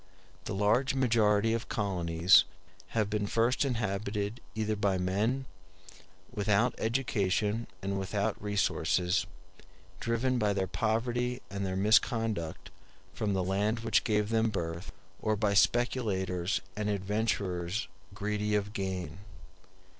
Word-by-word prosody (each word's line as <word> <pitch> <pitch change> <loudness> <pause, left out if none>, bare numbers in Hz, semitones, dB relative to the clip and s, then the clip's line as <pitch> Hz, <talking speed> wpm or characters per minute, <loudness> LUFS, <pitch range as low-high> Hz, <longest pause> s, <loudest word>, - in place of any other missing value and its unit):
The - - -3
large 115 +8 +2
majority 115 -4 +3
of 115 0 -3
colonies 90 -1 +4 0.5
have 110 -2 +2
been 105 -1 -1
first 115 +6 +2
inhabited 105 -3 -2
either 110 -1 0
by 100 -2 +1
men 105 +9 0 0.9
without 110 +1 +2
education 110 -2 0 0.2
and 100 0 -1
without 100 +1 -2
resources, 100 -2 +1 0.7
driven 120 +2 0
by 105 -2 +2
their 95 -1 0
poverty 120 +4 -1
and 100 0 -3
their 95 -1 -2
misconduct 105 -3 +1 0.4
from 105 -2 -1
the 95 - +1
land 105 +5 0
which 115 -2 +2
gave 105 -2 +1
them 115 0 +2
birth, 85 -2 -4 0.3
or 110 -1 +1
by 105 -1 +1
speculators 100 -5 +1
and 105 0 -2
adventurers 100 -2 -1 0.3
greedy 105 +1 -1
of 105 0 -1
gain. 95 -4 -4
105 Hz, 115 wpm, -30 LUFS, 95-115 Hz, 0.9 s, colonies